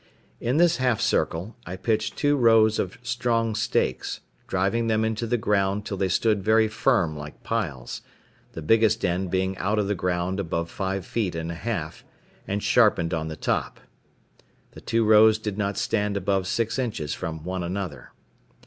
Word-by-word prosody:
In 125 +5 0
this 175 0 +4
half 125 -3 +1
circle 90 +8 0
I 90 - -6
pitched 110 +3 -1
two 145 0 +2
rows 115 -4 +4
of 95 +4 -2
strong 120 -2 0
stakes, 65 - -1 0.3
driving 100 +5 0
them 110 0 +2
into 110 +1 -2
the 120 +2 +1
ground 105 -2 0
till 100 - -3
they 95 0 0
stood 105 +3 +1
very 110 +1 +4
firm 110 -7 +1
like 75 0 -9
piles, 80 - -3 0.5
the 80 - -7
biggest 110 +4 +3
end 90 +1 -1
being 95 +1 0
out 105 +3 0
of 105 -2 +1
the 105 - +1
ground 90 0 -1
above 85 -2 -2
five 95 -1 -3
feet 100 -7 -2
and 80 0 -3
a - - -4
half, 85 -4 -4 0.4
and 100 +1 -2
sharpened 105 -8 +3
on 80 -1 -2
the 80 - -5
top. - - -2 0.9
The - - -12
two 115 0 +1
rows 110 0 +6
did 105 -2 -5
not 100 -1 -1
stand 105 -1 0
above 95 -1 0
six 115 +5 -1
inches 105 - -2
from 80 -1 -5
one 90 +1 -3
another. 85 -6 -5
100 Hz, 175 wpm, -25 LUFS, 90-110 Hz, 0.9 s, rows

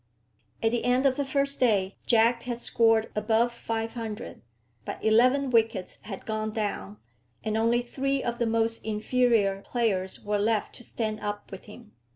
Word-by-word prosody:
At 225 - +3
the 240 - -1
end 250 +2 +2
of 265 -1 +4
the 285 - 0
first 275 +1 -1
day 200 -6 +2
Jack 235 0 +4
had 240 -1 -4
scored 225 -2 +2
above 225 +3 +2
500; 225 -1 -5 0.4
but - - -5
eleven 255 +5 +4
wickets 225 -5 +1
had 200 -3 -8
gone 215 0 -2
down, 200 - -3 0.5
and 215 -1 -1
only 230 +2 +2
three 275 +2 -1
of 240 0 -3
the 235 - +1
most 225 0 0
inferior 220 -2 +1
players 200 -6 -1
were 205 0 0
left 215 0 0
to 240 - -8
stand 215 -2 -3
up 205 -1 -5
with 195 - -9
him. 215 +1 -13
225 Hz, 165 wpm, -27 LUFS, 215-240 Hz, 0.5 s, of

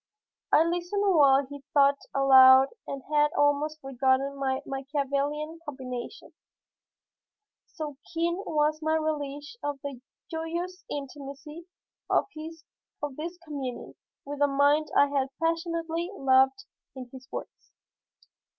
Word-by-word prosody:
I 310 - +6
listened 350 +4 -1
while 280 -3 +5
he 285 +1 -10
thought 280 0 +5
aloud 265 -1 +7 0.2
and 275 -1 -5
had 295 0 +4
almost 290 +2 +2
forgotten 270 +1 +1
my 265 -1 -1
Machiavellian 280 +3 -2
combination, 260 - -7 1.3
so 305 -7 -7
keen 340 +1 0
was 305 0 +1
my 315 0 +1
relish 295 +3 -4
of 290 -1 -3
the 275 -3 -6 0.3
joyous 340 +3 -4
intimacy 290 +3 -8 0.4
of - - +3 0.9
this 335 +4 -6
communion 275 -5 -6 0.3
with 290 0 -6
a 285 - +5
mind 285 +2 +3
I 285 - +7
had 280 -2 0
passionately 330 +1 -1
loved 265 +5 +3 0.3
in 255 -1 -7
his 260 0 -11
works. - - -8
290 Hz, 115 wpm, -27 LUFS, 275-320 Hz, 1.3 s, aloud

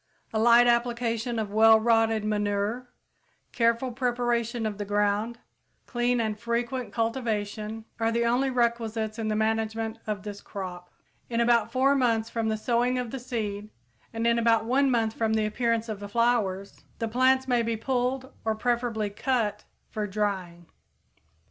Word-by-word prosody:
A 220 - +1
light 235 +2 +6
application 235 -1 0
of 215 -2 -2
well 220 +1 +7
rotted 225 -1 +2
manure, 210 +3 -1 0.6
careful 235 +2 +1
preparation 240 -2 -1
of 210 -1 -3
the - - -1
ground, 205 +3 0 0.5
clean 240 0 0
and 215 -2 -1
frequent 235 +2 -2
cultivation, 220 -2 -2
are 225 0 +1
the 235 +1 +1
only 250 +3 +2
requisites 230 -3 -1
in 220 - -2
the 215 - 0
management 220 +1 -1
of 210 -2 -3
this 205 -1 -7
crop. 180 -3 -7 0.4
In 235 -1 -1
about 235 -1 +3
four 265 +2 +3
months 230 -4 +1
from 230 -1 -1
the 220 0 0
sowing 245 +2 +1
of 245 -2 -3
the 270 - -4
seed, 215 -4 -4 0.4
and 225 0 -3
in 235 0 +3
about 230 -1 +3
one 270 +4 +3
month 225 -3 +1
from 225 -1 0
the 220 -1 +1
appearance 230 +1 0
of 215 -3 -5
the 205 0 -7
flowers, 205 -4 0
the 230 - -2
plants 260 +3 +3
may 245 -2 +2
be 230 -1 -1
pulled, 260 +2 -2
or 220 -1 0
preferably 230 -2 -1
cut, 215 -2 -1 0.3
for 210 -1 -2
drying. 190 -4 -3
230 Hz, 160 wpm, -27 LUFS, 215-240 Hz, 0.6 s, well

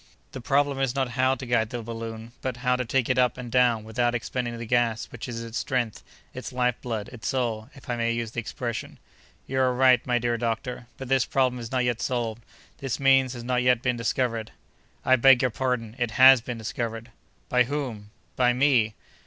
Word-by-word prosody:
The 130 - -7
problem 140 +1 +1
is 135 -1 0
not 135 -2 0
how 130 +2 +2
to 130 - -8
guide 115 -3 +1
the 120 -1 -5
balloon, 115 0 -7
but 130 -2 -3
how 125 0 +4
to 125 - -1
take 125 +1 0
it 125 -1 +1
up 125 -1 +2
and 125 -2 -7
down 120 -3 +3
without 120 +2 0
expending 120 +1 -3
the 115 - -6
gas 115 -1 +1
which 120 0 -7
is 115 -1 -5
its 115 0 -4
strength, 120 -4 -2 0.3
its 130 +3 -7
life 125 -1 +1
blood, 110 -4 -4
its 120 -3 -7
soul, 120 -3 -1
if 135 - -15
I 120 - -1
may 115 0 0
use 115 -1 -3
the 120 - -3
expression." 120 0 -5 0.5
"You 130 0 -2
are 130 -1 +2
right, 125 -1 +5
my 125 -1 +2
dear 120 0 -1
doctor; 120 +1 -3
but 135 - -7
this 135 0 +2
problem 130 -2 +1
is 115 -1 -7
not 130 -1 +1
yet 120 -2 -1
solved; 120 -3 -2 0.4
this 135 -3 -3
means 135 -2 +4
has 120 -2 -7
not 125 0 0
yet 125 -1 +3
been 125 -1 +1
discovered." 115 -1 -1 0.6
"I 130 - +5
beg 135 +1 +6
your 130 - +2
pardon, 120 -2 -2
it 120 -2 0
has 130 -1 +8
been 120 +1 -5
discovered." 115 +1 -4 0.4
"By 125 -1 +3
whom?" 125 -7 -4 0.3
"By 125 -1 +3
me!" 125 -5 +3
125 Hz, 210 wpm, -26 LUFS, 115-130 Hz, 0.6 s, has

